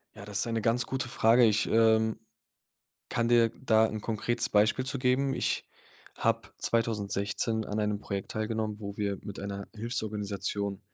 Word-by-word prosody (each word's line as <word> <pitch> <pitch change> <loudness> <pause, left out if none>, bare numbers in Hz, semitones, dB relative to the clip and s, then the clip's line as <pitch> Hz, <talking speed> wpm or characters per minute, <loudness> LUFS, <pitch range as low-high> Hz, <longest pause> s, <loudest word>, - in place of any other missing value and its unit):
Ja, 100 - -9
das 100 -1 -3
ist - - 0
eine 115 -1 -1
ganz 120 +2 +1
gute 130 -2 -2
Frage. 120 +2 +4
Ich, 105 -1 +2
ähm, 110 -1 +3 0.9
kann 115 0 0
dir 120 -1 +5
da 110 -3 +4
'n 110 -1 -4
konkretes 115 +2 -1
Beispiel 110 +5 +3
zu 135 +1 -2
geben. 130 +1 +2
Ich - - -1 0.5
habe - - 0
2016 110 0 -1
an 105 - -3
einem 105 -1 0
Projekt 100 -2 -4
teilgenommen, 110 -1 -2
wo 100 -1 -6
wir 100 -2 -1
mit 100 - -7
einer 100 0 -5
Hilfsorganisation 105 -3 -3
110 Hz, 160 wpm, -29 LUFS, 105-115 Hz, 0.9 s, dir